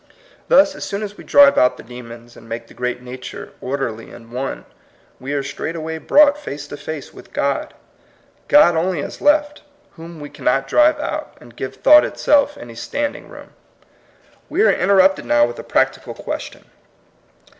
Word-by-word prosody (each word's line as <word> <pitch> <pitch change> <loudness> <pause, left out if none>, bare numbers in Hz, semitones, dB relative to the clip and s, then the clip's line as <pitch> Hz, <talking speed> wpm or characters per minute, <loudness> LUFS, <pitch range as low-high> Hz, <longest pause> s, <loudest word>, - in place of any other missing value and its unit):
Thus, 290 +1 +5
as 295 - -8
soon 200 +2 -4
as 205 -1 -6
we - - -12
drive 285 0 +6
out 125 - +3
the - - -11
demons, 120 0 -12
and 115 - -15
make 115 0 -5
the - - -17
great 125 0 -4
nature 125 0 -9
or 135 +2 -3
derly 115 -5 -5
and 115 -1 -14
one, 130 +2 -5 0.5
we 135 +2 -6
are 140 -1 -1
straightway 160 +3 -5
brought 290 - +4
face 150 - -7
to 145 - -7
face 145 0 -7
with - - -15
God. 140 -1 -2 0.7
God 290 - +6
only 170 -1 0
is - - -8
left, 295 0 +2 0.3
whom 165 -1 -11
we 145 -1 -9
cannot 135 +2 0
drive 305 - +3
out, 305 0 -5
and 120 -1 -16
give 130 +1 -6
thought 300 - +6
itself 290 0 +1
any 120 - -10
standing 285 - -4
room. - - -12 1.0
We 405 - +1
are - - +5
interrupted 190 -3 +3
now 120 0 +4
with 120 0 -7
a - - -7
practical - - -1
question. - - -7
150 Hz, 175 wpm, -19 LUFS, -, 1.0 s, drive